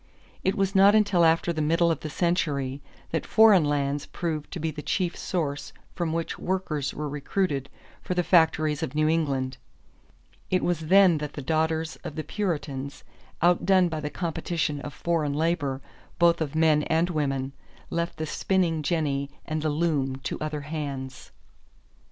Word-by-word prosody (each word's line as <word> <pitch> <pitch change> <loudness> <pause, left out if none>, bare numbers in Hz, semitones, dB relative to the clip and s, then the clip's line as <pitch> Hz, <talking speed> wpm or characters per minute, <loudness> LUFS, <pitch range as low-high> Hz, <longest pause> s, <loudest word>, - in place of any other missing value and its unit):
It 190 - +1
was 195 -2 0
not 200 +1 +6
until 205 -5 +4
after 165 +1 +3
the 155 - -2
middle 165 +2 +3
of 165 - -1
the 155 - -6
century 145 -5 -1 0.3
that 160 - -1
foreign 215 -5 +6
lands 145 -1 -1
proved 155 -4 -4
to 180 - -6
be 160 0 -1
the 150 0 -7
chief 180 +2 -1
source 150 -5 -3 0.2
from 170 -3 -2
which 165 0 -3
workers 155 -7 -2
were 150 0 -4
recruited 145 0 -2 0.3
for 180 - -3
the 180 - +2
factories 160 -3 +3
of 150 -3 -4
New 155 0 +2
England. 135 -5 0 0.9
It 185 - +1
was 175 -2 +1
then 190 -3 +6
that 150 -1 -5
the 145 - -6
daughters 160 +2 0
of 150 - -6
the 155 - -3
Puritans, 145 -7 -3 0.4
outdone 180 +1 +4
by 160 -1 -3
the 150 -1 -3
competition 165 -2 -2
of 145 - -6
foreign 160 -2 -1
labor, 150 -4 0 0.4
both 170 -1 +4
of 155 -1 -2
men 160 -2 +4
and 165 +2 +1
women, 135 -4 -1 0.4
left 170 0 -2
the 155 - -2
spinning 170 -1 0
jenny 145 -3 -1 0.2
and 155 0 -2
the 155 - 0
loom 145 -4 0
to - - -3
other 155 -1 -3
hands. 140 -3 -6
160 Hz, 165 wpm, -26 LUFS, 145-170 Hz, 0.9 s, not